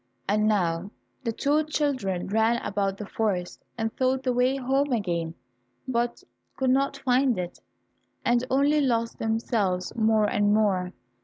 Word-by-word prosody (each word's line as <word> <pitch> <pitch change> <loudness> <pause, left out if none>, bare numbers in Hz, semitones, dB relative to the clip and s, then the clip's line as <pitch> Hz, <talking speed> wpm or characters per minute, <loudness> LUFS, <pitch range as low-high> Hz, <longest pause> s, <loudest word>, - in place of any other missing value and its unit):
And 210 +1 +2
now 180 -3 +1 0.3
the 230 - 0
two 290 +6 +1
children 260 - -1
ran 220 +3 +2
about 195 -1 -1
the 210 - -6
forest, 195 -4 -2
and 225 -1 -1
sought 260 0 +1
the 255 -2 +1
way 250 +2 +2
home 270 +2 0
again, 170 -8 -1 0.5
but 240 -1 -1 0.3
could 260 -1 +2
not 275 +1 +1
find 255 -3 +2
it, 180 -1 -5 0.7
and 240 0 +3
only 285 +3 +3
lost 230 -4 0
themselves 220 -5 -1
more 220 -1 +3
and 205 0 +2
more. 190 -4 +1
225 Hz, 145 wpm, -26 LUFS, 200-260 Hz, 0.7 s, and